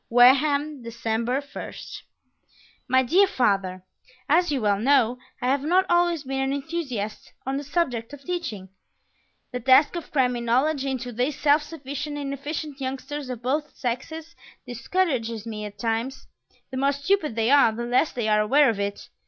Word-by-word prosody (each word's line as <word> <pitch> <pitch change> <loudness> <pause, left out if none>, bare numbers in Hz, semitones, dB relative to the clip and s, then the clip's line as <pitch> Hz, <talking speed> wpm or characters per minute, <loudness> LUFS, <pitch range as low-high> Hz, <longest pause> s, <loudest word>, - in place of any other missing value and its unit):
Wareham, 280 +4 +4
December 230 +2 -2
1st 285 - -8 0.9
My 260 0 +4
Dear 365 +11 +4
Father, 195 - 0 0.4
As 340 +2 +3
you 280 - 0
well 205 -3 +1
know, 250 -1 +3 0.2
I - - -4
have 275 +1 +2
not 360 +6 +3
always 345 -3 +2
been 270 0 -3
an 270 0 0
enthusiast 275 -8 -4
on 270 +1 -1
the 285 - -4
subject 265 -7 -1
of 290 -1 -11
teaching. 250 - -4 0.8
The 250 - -3
task 260 +7 +5
of 340 - -5
cramming 250 -4 +1
knowledge 270 +4 +2
into 255 -2 -3
these 250 +5 -2
self 295 +1 +4
sufficient, 295 -1 -6
inefficient 285 +1 -5
youngsters 270 +1 -4
of 245 -2 -6
both 295 +4 -1
sexes 315 +7 -4 0.3
discourages 240 - -1
me 215 -2 -5
at 205 0 -9
times. 230 +5 -2 0.5
The 260 - -4
more 275 +2 +2
stupid 300 - 0
they 225 +2 +1
are, 280 -5 +6
the 235 +2 -4
less 250 +6 +2
they 235 -3 -2
are 210 0 +4
aware 270 +5 +4
of 210 - -6
it. 200 0 -3
265 Hz, 160 wpm, -25 LUFS, 235-295 Hz, 0.9 s, are